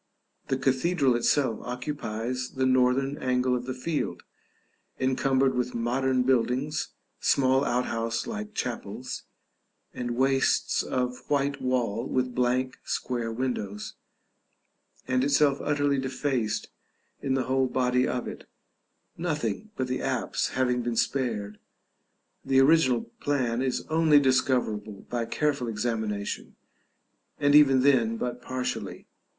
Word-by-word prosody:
The 135 Hz, -, 0 dB
cathedral 135 Hz, +1 st, +2 dB
itself 120 Hz, 0 st, +1 dB
occupies 125 Hz, -1 st, -4 dB
the 130 Hz, 0 st, +1 dB
northern 130 Hz, +2 st, +2 dB
angle 125 Hz, 0 st, +1 dB
of 125 Hz, 0 st, -4 dB
the 130 Hz, -, -2 dB
field, 150 Hz, +4 st, -3 dB, 0.8 s
encumbered 130 Hz, 0 st, +2 dB
with 125 Hz, -1 st, -2 dB
modern 125 Hz, +2 st, +1 dB
buildings, 130 Hz, +4 st, 0 dB, 0.2 s
small 135 Hz, 0 st, +3 dB
outhouse 115 Hz, -3 st, -1 dB
like 215 Hz, -1 st, -6 dB
chapels, 125 Hz, +1 st, -4 dB, 0.7 s
and 120 Hz, -1 st, -3 dB
wastes 135 Hz, 0 st, +2 dB
of 125 Hz, -1 st, -3 dB
white 140 Hz, -1 st, 0 dB
wall 125 Hz, -2 st, 0 dB
with 125 Hz, -1 st, -1 dB
blank 125 Hz, +1 st, 0 dB
square 120 Hz, -2 st, -2 dB
windows, 110 Hz, -4 st, -3 dB, 1.1 s
and 130 Hz, 0 st, +2 dB
itself 140 Hz, 0 st, +3 dB
utterly 145 Hz, -2 st, +1 dB
defaced 130 Hz, -4 st, -1 dB, 0.5 s
in 135 Hz, -1 st, 0 dB
the 130 Hz, -, +1 dB
whole 130 Hz, +1 st, +1 dB
body 125 Hz, 0 st, +1 dB
of 125 Hz, -1 st, -2 dB
it, -, -, -9 dB, 0.7 s
nothing 150 Hz, -, -2 dB
but 130 Hz, -, -1 dB
the 130 Hz, 0 st, -2 dB
apse -, -, -1 dB
having 125 Hz, -1 st, +2 dB
been 120 Hz, -1 st, -2 dB
spared; 110 Hz, -6 st, -1 dB, 0.8 s
the 135 Hz, 0 st, +3 dB
original 135 Hz, -4 st, +5 dB, 0.2 s
plan 130 Hz, -4 st, 0 dB
is 130 Hz, -1 st, -1 dB
only 155 Hz, -2 st, +4 dB
discoverable 125 Hz, -6 st, 0 dB
by 120 Hz, -1 st, -1 dB
careful 140 Hz, -1 st, 0 dB
examination, 110 Hz, -2 st, -3 dB, 0.8 s
and 145 Hz, -1 st, +3 dB
even 135 Hz, -3 st, +7 dB
then 120 Hz, -5 st, +3 dB
but 125 Hz, +1 st, -4 dB
partially. 130 Hz, 0 st, -4 dB
130 Hz, 120 wpm, -27 LUFS, 120-135 Hz, 1.1 s, even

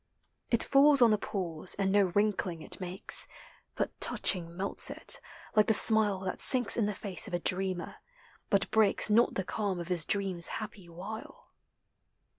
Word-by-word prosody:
It 235 Hz, -, +3 dB
falls 280 Hz, +1 st, +5 dB
on 235 Hz, -3 st, +5 dB
the 215 Hz, -, +2 dB
pools, 180 Hz, -4 st, -2 dB
and 195 Hz, -1 st, -1 dB
no 200 Hz, 0 st, +3 dB
wrinkling 195 Hz, -5 st, -1 dB
it -, -, -6 dB
makes, 180 Hz, +1 st, -1 dB, 0.5 s
But -, -, -3 dB
touching 170 Hz, -3 st, +1 dB
melts 195 Hz, +1 st, 0 dB
in. -, -, -8 dB, 0.6 s
like 215 Hz, -1 st, +3 dB
the 220 Hz, -, +5 dB
smile 210 Hz, -3 st, +4 dB
Thatsinks 245 Hz, +5 st, +2 dB
in 225 Hz, -, 0 dB
the 210 Hz, -1 st, -4 dB
face 195 Hz, 0 st, -5 dB
of 185 Hz, -, -4 dB
a -, -, -2 dB
dreamer, 185 Hz, 0 st, -3 dB, 0.5 s
bu1 200 Hz, -2 st, 0 dB
breaks 215 Hz, -1 st, +1 dB
Not 230 Hz, +3 st, +2 dB
the 190 Hz, -, -2 dB
calm 195 Hz, -1 st, -4 dB
of 170 Hz, +1 st, -8 dB
his 175 Hz, -3 st, -1 dB
dream's 195 Hz, -4 st, -1 dB
happy 210 Hz, -4 st, -9 dB
Wtle. 195 Hz, +6 st, -10 dB
195 Hz, 165 wpm, -29 LUFS, 180-215 Hz, 0.6 s, falls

